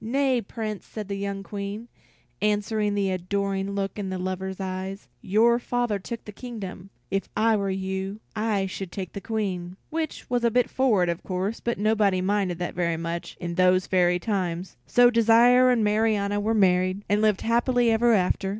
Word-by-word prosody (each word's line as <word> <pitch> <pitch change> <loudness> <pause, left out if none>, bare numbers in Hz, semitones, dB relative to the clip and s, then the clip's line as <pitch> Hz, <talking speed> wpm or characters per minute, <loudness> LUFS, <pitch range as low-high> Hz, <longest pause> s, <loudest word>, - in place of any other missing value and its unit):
"Nay, 260 +1 +1
Prince," 215 -1 -5
said 215 -3 -6
the 200 - -2
young 200 0 -4
Queen, 205 +3 -6 0.5
answering 210 0 0
the 195 -2 +1
adoring 195 +2 -2
look 195 +1 -3
in 190 -2 -3
her 185 - -2
lover's 185 +1 -4
eyes, 190 +1 -5
"your 230 +4 +3
father 240 -4 -1
took 230 +4 -7
the 210 - -8
kingdom; 200 -5 -8 0.2
if 195 - -1
I 220 +1 +4
were 200 -2 -1
you, 190 +1 -3 0.2
I 210 -3 0
should 190 -1 -6
take 190 -3 -6
the 200 - -6
Queen." 190 -5 -3
Which 320 -1 -3
was 245 -1 0
a 235 - +4
bit 245 +2 +1
forward, 220 -9 +2
of 170 0 -2
course, 190 +4 -3
but 235 - -2
nobody 205 -3 +2
minded 190 -2 0
that 175 0 -3
very 170 -2 0
much 170 +1 -5
in 170 -1 -4
those 185 +1 +3
fairy 180 -1 +3
times. 180 -2 -3
So 245 +9 +5
Desire 235 +2 +5
and 240 -3 +3
Marianna 210 -1 +1
were 220 +2 0
married, 185 0 +2
and 205 +1 +2
lived 215 -3 +2
happily 240 +1 +2
ever 235 +2 +3
after. 190 -1 +1
200 Hz, 180 wpm, -25 LUFS, 185-225 Hz, 0.5 s, So